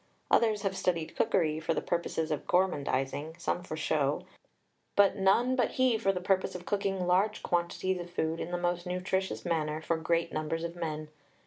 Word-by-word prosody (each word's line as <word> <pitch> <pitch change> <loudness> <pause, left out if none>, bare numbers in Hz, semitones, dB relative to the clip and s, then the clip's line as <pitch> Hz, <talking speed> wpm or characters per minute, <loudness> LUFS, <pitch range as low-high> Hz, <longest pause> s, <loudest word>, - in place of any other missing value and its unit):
Others 220 -3 +3
have 195 -1 0
studied 170 -4 -1
cookery 160 -7 +2
for 160 - -1
the - - +1
purposes 165 -2 -1
of 150 - -3
gormandizing, 150 -3 0
some 175 - -1
for 165 -3 -6
show, 145 -2 0 0.7
but 200 -1 +5
none 210 +6 +3
but 245 -3 +1
he 255 -2 +3
for 215 -3 +2
the 185 - -3
purpose 190 +1 +1
of 175 -1 -7
cooking 195 -2 -1
large 190 +4 +2
quantities 175 +2 0
of 175 0 -6
food 165 -2 -1
in - - -4
the 175 - -1
most 175 0 -1
nutritious 185 +1 -2
manner 155 -3 0
for 160 +1 -1
great 165 +1 0
numbers 155 +2 -2
of 170 0 -4
men. 155 -3 -4
175 Hz, 185 wpm, -30 LUFS, 160-190 Hz, 0.7 s, but